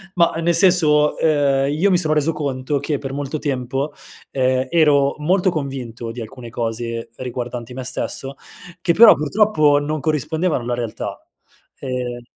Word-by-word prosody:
Mah 170 Hz, -2 st, +3 dB
nel 170 Hz, +1 st, +2 dB
senso, 160 Hz, -4 st, +5 dB
ehm, 140 Hz, -3 st, +1 dB
io 185 Hz, +7 st, +2 dB
mi 180 Hz, -, +4 dB
sono 155 Hz, -3 st, +2 dB
reso 155 Hz, +2 st, +1 dB
conto 140 Hz, -1 st, -2 dB
che, 145 Hz, +1 st, -2 dB
per 135 Hz, -1 st, -6 dB
molto 145 Hz, +2 st, -4 dB
tempo, 135 Hz, 0 st, -3 dB, 0.4 s
ehm, 130 Hz, 0 st, 0 dB
ero 145 Hz, -4 st, +3 dB
molto 180 Hz, +5 st, +1 dB
convinto 130 Hz, -7 st, -5 dB
di 120 Hz, -, -9 dB
alcune 120 Hz, +1 st, -9 dB
cose 115 Hz, 0 st, -4 dB
riguardanti 125 Hz, -1 st, -6 dB
me 130 Hz, +1 st, -6 dB
stesso, 135 Hz, +2 st, -3 dB, 0.5 s
che 170 Hz, -, +2 dB
però 225 Hz, +5 st, +8 dB
purtroppo, 155 Hz, -3 st, +2 dB
non 150 Hz, +1 st, -3 dB
corrispondevano 155 Hz, -1 st, -1 dB
alla 120 Hz, +1 st, -2 dB
realtà. 120 Hz, -3 st, -5 dB, 0.6 s
Ehm 125 Hz, -2 st, -4 dB
140 Hz, 150 wpm, -20 LUFS, 125-155 Hz, 0.6 s, però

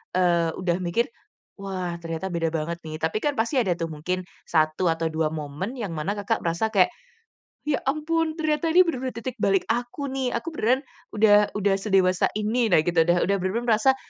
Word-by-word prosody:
eee, 170 Hz, -2 st, +3 dB
udah 175 Hz, -1 st, 0 dB
mikir, 180 Hz, +8 st, 0 dB, 0.5 s
"Wah 185 Hz, -3 st, -4 dB
ternyata 165 Hz, +3 st, -4 dB
beda 165 Hz, -1 st, 0 dB
banget 165 Hz, +2 st, -2 dB
nih," 155 Hz, 0 st, -5 dB
tapi 160 Hz, +6 st, 0 dB
kan 295 Hz, -1 st, +1 dB
pasti 235 Hz, +5 st, 0 dB
ada 190 Hz, -7 st, +2 dB
tuh 165 Hz, -1 st, -3 dB
mungkin 180 Hz, +5 st, -3 dB, 0.2 s
1 155 Hz, +2 st, +2 dB
atau 165 Hz, 0 st, 0 dB
2 160 Hz, 0 st, 0 dB
momen 155 Hz, -, -5 dB
yang 205 Hz, -7 st, -4 dB
mana 155 Hz, +7 st, -1 dB
Kakak 205 Hz, +2 st, -1 dB
merasa 170 Hz, +7 st, 0 dB
kayak, 185 Hz, -3 st, +5 dB, 0.8 s
"Ya 285 Hz, -, +2 dB
ampun 315 Hz, +2 st, 0 dB
ternyata 310 Hz, 0 st, 0 dB
ini 365 Hz, +2 st, +8 dB
bener-bener 260 Hz, -6 st, -2 dB
titik 250 Hz, +2 st, -5 dB
balik 195 Hz, -2 st, +2 dB
aku 245 Hz, +4 st, -2 dB
nih, 265 Hz, -2 st, -1 dB
aku 320 Hz, +8 st, -2 dB
beneran 255 Hz, +4 st, +2 dB, 0.3 s
udah 210 Hz, -1 st, +5 dB
udah 200 Hz, -1 st, +2 dB
sedewasa 190 Hz, -3 st, +3 dB
ini." 220 Hz, +2 st, +1 dB
Nah 155 Hz, -, +7 dB
gitu, 175 Hz, -1 st, 0 dB
udah 175 Hz, 0 st, +3 dB
udah 200 Hz, +1 st, +2 dB
bener-bener 205 Hz, +6 st, -1 dB
merasa, 245 Hz, +5 st, +4 dB
195 Hz, 185 wpm, -25 LUFS, 170-245 Hz, 0.8 s, ini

